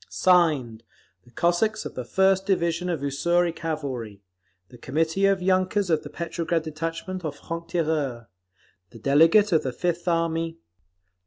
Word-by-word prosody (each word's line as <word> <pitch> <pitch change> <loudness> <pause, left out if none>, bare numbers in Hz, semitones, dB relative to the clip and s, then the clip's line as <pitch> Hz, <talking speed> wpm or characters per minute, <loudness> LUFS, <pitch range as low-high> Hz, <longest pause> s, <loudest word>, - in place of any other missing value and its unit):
Signed, 150 -11 +2 0.4
_The 120 - -22
Cossacks 215 +6 +1
of - - -6
the 125 - -5
First 190 - +2
Division 175 -2 0
of 165 -5 -2
Ussuri 170 +5 +1
Cavalry; 130 -11 -5 0.5
the 125 - -15
Committee 160 +9 +1
of 195 -2 +1
Yunkers 185 0 +1
of 160 - +2
the 145 - -9
Petrograd 170 0 -2
detachment 165 +4 -5
of 150 -3 -4
Franc 165 +2 -7
Tireurs; 155 -8 -1 0.6
the 115 - -13
delegate 165 - +4
of 160 - +4
the 130 - -3
Fifth 175 +6 -2
Army. 165 -1 0
165 Hz, 145 wpm, -25 LUFS, 145-180 Hz, 0.6 s, delegate